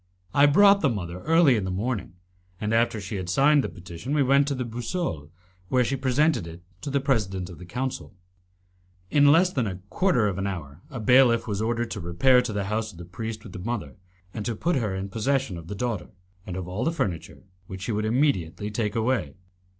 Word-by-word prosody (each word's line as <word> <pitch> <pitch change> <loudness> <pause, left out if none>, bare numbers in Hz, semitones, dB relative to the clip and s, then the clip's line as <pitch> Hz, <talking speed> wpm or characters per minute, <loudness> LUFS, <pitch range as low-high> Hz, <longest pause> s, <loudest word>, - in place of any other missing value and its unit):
I 140 +1 +6
brought 200 +6 +6
the 140 - +3
mother 90 -6 -4
early 165 -5 +5
in 105 - -1
the 95 - -3
morning, 100 0 -3 0.5
and 105 +1 -1
after 115 0 +2
she 100 +1 -5
had 90 -2 -5
signed 140 +8 +4
the - - -3
petition 90 - -6
we 145 - +4
went 140 +2 +4
to 140 - -1
the 125 -1 -3
Boussole, 115 - -4 0.4
where 125 -1 +3
she 130 +3 -1
presented 135 - +1
it 85 +1 -11 0.2
to 145 - -4
the 140 0 +1
President 100 -10 -1
of 85 - -12
the 90 - -11
Council. 125 - -4 1.0
In 145 -1 +6
less 180 +4 +4
than 125 -5 0
a 95 - -3 0.2
quarter 140 - +2
of 95 -2 -2
an 100 - -1
hour 80 -5 -6
a 130 - -6
bailiff 125 0 +5
was 105 -3 -2
ordered 115 +1 -1
to 105 - -4
repair 95 +10 +4
to 125 -2 -4
the 100 -1 -2
house 110 +2 -2
of 90 - -16
the 85 - -9
priest 110 +5 -6
with 100 - -11
the 90 - -7
mother, 100 - -4 0.4
and 110 - -4
to 115 - -2
put 170 +10 0
her 105 -6 -1
in 95 +1 -4
possession 130 +1 -1
of 85 0 -9
her 100 - -4
daughter, 115 -4 -3 0.4
and 90 - -5
of 90 -2 -5
all 95 +7 -3
the 165 - +1
furniture, 95 - -4 0.2
which 95 0 -7
she 115 - -2
would 105 0 -1
immediately 110 - 0
take 105 0 -2
away. 115 - 0
110 Hz, 220 wpm, -25 LUFS, 95-130 Hz, 1.0 s, I